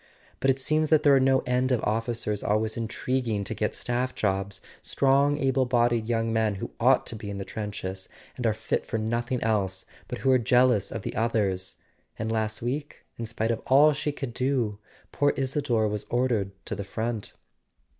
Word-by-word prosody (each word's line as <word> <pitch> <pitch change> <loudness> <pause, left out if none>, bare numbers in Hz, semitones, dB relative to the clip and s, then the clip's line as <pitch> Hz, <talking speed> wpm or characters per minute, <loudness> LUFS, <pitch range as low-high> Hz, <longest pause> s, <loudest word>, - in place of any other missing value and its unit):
But 135 - +1
it 135 - +3
seems 155 +3 +1
there 150 -2 +5
are - - +5
no 130 0 +3
end 125 +1 +1
of 125 - +1
officers 115 -1 -1
always 110 +1 0
intriguing 115 -1 -1
to - - -4
get - - -2
staff 125 +1 -2
jobs: 95 -1 -1 0.2
strong 140 +1 +2
able 135 -2 +2
bodied 120 -2 +2
young 115 -1 0
men 110 -2 +1
who 95 - -6
ought - - +4
to - - -2
be 105 -1 -7
in 100 - -4
the 95 - -5
trenches, 100 -3 -5 0.3
and 125 -2 -1
are - - +4
fit 110 - -1
for - - -2
nothing 115 +3 -1
else, 95 -4 0 0.2
but - - -4
who 135 - +2
are 130 - +5
jealous 125 -2 +3
of - - -5
the - - -4
others. 100 -5 0 0.4
And 110 0 -2
last 110 0 -1
week, 140 +5 -4
in 115 - -3
spite 115 0 -1
of 115 - -2
all 145 +3 +6
she 150 +1 -2
could 135 -4 -6
do, 125 -5 0 0.3
poor 145 0 +2
Isador 130 -5 +1
was 105 0 -3
ordered 120 -5 +1 0.2
to - - -4
the 100 - -4
front." 110 +2 -4
115 Hz, 190 wpm, -27 LUFS, 110-130 Hz, 0.4 s, all